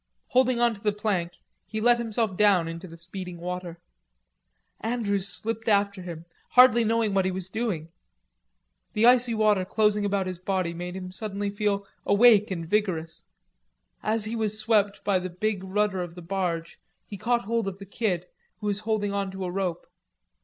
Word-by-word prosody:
Holding 255 -1 +3
on 240 -1 +3
to 200 - -12
the 210 - +2
plank, 200 -5 -1 0.3
he 220 - -4
let 240 +2 +4
himself 225 -3 -1
down 195 -4 +4
into 165 +3 -6
the 165 -1 -12
speeding 180 +1 -6
water. 175 0 -5 1.0
Andrews 210 -4 -1
slipped 225 +4 -1
after 200 -2 +2
him, 170 -2 -8 0.3
hardly 250 -2 +7
knowing 225 -2 +1
what 195 -1 +3
he - - +2
was 190 -1 -4
doing. 195 -8 -3 1.0
The 215 - +3
icy 245 -1 +5
water 210 -3 +3
closing 210 +2 +1
about 200 -1 0
his 185 -2 -5
body 185 -2 -1
made 175 +1 -6
him 185 -1 -6
suddenly 200 0 -2
feel 205 -1 -1 0.2
awake 210 0 +5
and 170 -4 -4
vigorous. 175 -5 -1 0.8
As 215 0 +1
he 220 +2 -3
was 215 -2 -1
swept 215 -2 +1
by 195 -2 +2
the 185 0 -5
big 195 +2 -2
rudder 190 0 0
of 175 -1 -6
the 175 - -9
barge, 170 -2 -3 0.3
he 205 - -8
caught 235 +4 +1
hold 230 -1 0
of 195 -1 -4
the 200 - -10
Kid, 190 -3 -1 0.3
who 210 - -9
was 205 -1 0
holding 215 -2 -1
on 200 -1 -1
to 190 0 -5
a 180 - -3
rope. 185 -2 -2
200 Hz, 180 wpm, -26 LUFS, 185-220 Hz, 1.0 s, hardly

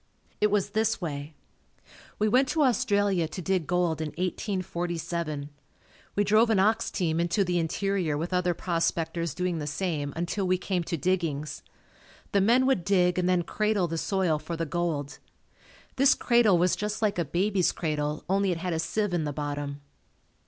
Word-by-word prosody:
It 210 - +4
was 205 -1 0
this 220 0 +1
way. 150 -3 -5 0.8
We 215 - +2
went 255 +5 +4
to 310 +1 +1
Australia 205 - +2
to 160 - -7
dig 185 -2 -1
gold 175 -3 +1
in 155 - -2
1847. 170 -4 -3 0.6
We 205 - +3
drove 215 +3 +4
an 220 - +3
ox 220 +4 +2
team 165 -3 -1
into 175 +4 +2
the 175 -1 0
interior 175 -1 -1
with 170 +4 -3
other 180 -1 +1
prospectors 170 -2 -1
doing 180 -2 -1
the 150 - -4
same 150 -2 -2
until 175 +3 -2
we 185 0 +3
came 180 -1 -2
to 170 - -2
diggings. 155 -4 -1 0.7
The 200 - +3
men 240 +6 +4
would 260 -10 +2
dig 180 -1 +2
and 180 0 +1
then 180 -1 +2
"cradle" 210 0 0
the 165 0 -3
soil 185 -6 +1
for 170 +2 -5
the 165 - -1
gold. 155 -3 -2 0.8
This 275 +1 +5
cradle 235 -6 +4
was 180 +1 +2
just 210 +1 -3
like 205 -4 +1
a - - +2
baby's 185 +4 +1
cradle 150 -2 -2
only 195 +1 +2
it 175 - -1
had 175 +1 -3
a 160 - -1
sieve 205 +3 -1
in 165 -3 0
the 145 - -2
bottom. 145 -1 -4
180 Hz, 175 wpm, -27 LUFS, 160-200 Hz, 0.8 s, This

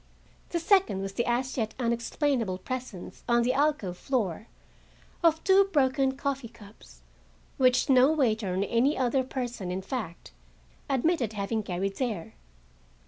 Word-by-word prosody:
The 345 - -1
second 335 - +2
was 195 0 -5
the 235 - -1
as 250 +2 -1
yet 220 -2 -2
unexplainable 235 -3 0
presence, 240 -3 -7
on 235 0 +4
the 250 +2 +1
alcove 275 -11 0
floor, 220 - -2 0.8
of 325 -1 +3
two 390 +1 +5
broken 270 -3 +2
coffee 275 -3 -2
cups, 220 -2 -17 0.5
which 255 -2 +3
no 260 +1 +5
waiter 220 -10 0
nor 200 - +1
any 255 +6 +2
other 260 +1 +1
person, 245 -7 -4
in 185 +1 -3
fact, 195 -6 -6 0.6
admitted 270 - +1
having 215 +2 -2
carried 195 0 -3
there. 215 - -3
240 Hz, 140 wpm, -28 LUFS, 205-270 Hz, 0.8 s, two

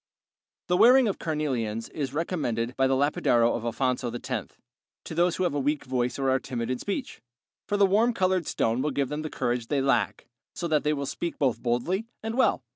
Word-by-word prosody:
The 180 - +1
wearing 250 +3 +7
of 200 - -2
carnelians 125 -9 -2
is 140 -4 -4
recommended 130 -7 -2
by 135 0 +3
the 135 - +2
Lapidario 120 -4 +2
of 115 - -4
Alfonso 125 +1 -1
X 120 - -4 0.5
to - - -7
those 175 +1 +2
who 185 - -1
have 175 - +1
a 145 - 0
weak 145 +2 -1
voice 125 -1 -1
or 135 -1 +1
are 130 - +2
timid 120 -3 -4
in 130 - -2
speech, 255 +6 -4 0.5
for 205 - 0
the 200 - +6
warm 215 +5 +3
colored 185 -6 +1
stone 115 +3 0
will 150 - 0
give 140 -1 -1
them 150 +1 -3
the 155 - -4
courage 120 -3 -2
they 145 - 0
lack, 135 0 +1 0.3
so 175 - -3
that 155 -2 +1
they 150 - +2
will 140 -1 -3
speak 170 +5 -4
both 130 -5 0
boldly 145 - -1 0.2
and 225 +1 -3
well. 250 - +2
140 Hz, 210 wpm, -27 LUFS, 125-175 Hz, 0.5 s, wearing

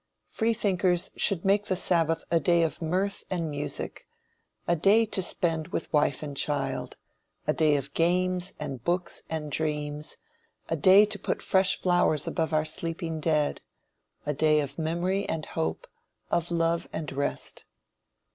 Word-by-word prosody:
Freethinkers 195 -6 +1
should 195 -4 +1
make 200 +1 +3
the 190 - 0
sabbath 165 -3 +2
a 165 - +4
day 170 +2 +3
of 160 - -2
mirth 185 +5 -1
and 170 -4 -2
music; 145 0 -5 0.6
a 175 - +3
day 200 +7 +4
to 210 -2 0
spend 165 -3 0
with - - -4
wife 145 -1 +2
and 145 -2 -6
child 135 -2 -1 0.5
a 150 - +2
day 155 -2 +3
of 140 0 -3
games, 180 +2 +1
and 135 -5 -5
books, 175 +3 -1
and 155 -2 -4
dreams 150 -1 -3 0.5
a 165 - +1
day 190 +7 +7
to 210 0 -3
put - - -3
fresh 190 0 +3
flowers 175 -5 +2
above 160 -2 -1
our 155 0 +2
sleeping 165 +1 -2
dead 150 -2 0 0.6
a 150 - 0
day 155 +1 +3
of 145 +2 -4
memory 175 +5 -1
and 160 -1 -2
hope, 80 0 -3 0.5
of 170 0 0
love 170 0 0
and 155 -2 -5
rest. 140 +1 -2
165 Hz, 155 wpm, -27 LUFS, 150-185 Hz, 0.6 s, day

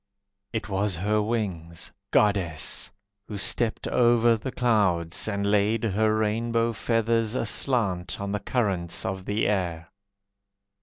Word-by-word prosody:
It 110 -3 -3
was 100 -1 0
her 105 +5 +1
wings, 95 -7 -3 0.2
Goddess! 95 -8 +1 0.4
Who 105 - -5
stepped 110 +2 +1
over 120 -1 +4
the 120 +4 -5
clouds, 95 -10 +1
And 100 -2 -1
laid 105 +2 +2
her 110 0 +2
rainbow 115 +2 0
feathers 115 +1 0
Aslant 105 -7 0
on 100 0 -3
the 105 - -1
currents 100 -6 -1
of 95 0 -4
the 105 +2 0
air. 85 -5 -2
105 Hz, 120 wpm, -26 LUFS, 95-115 Hz, 0.4 s, over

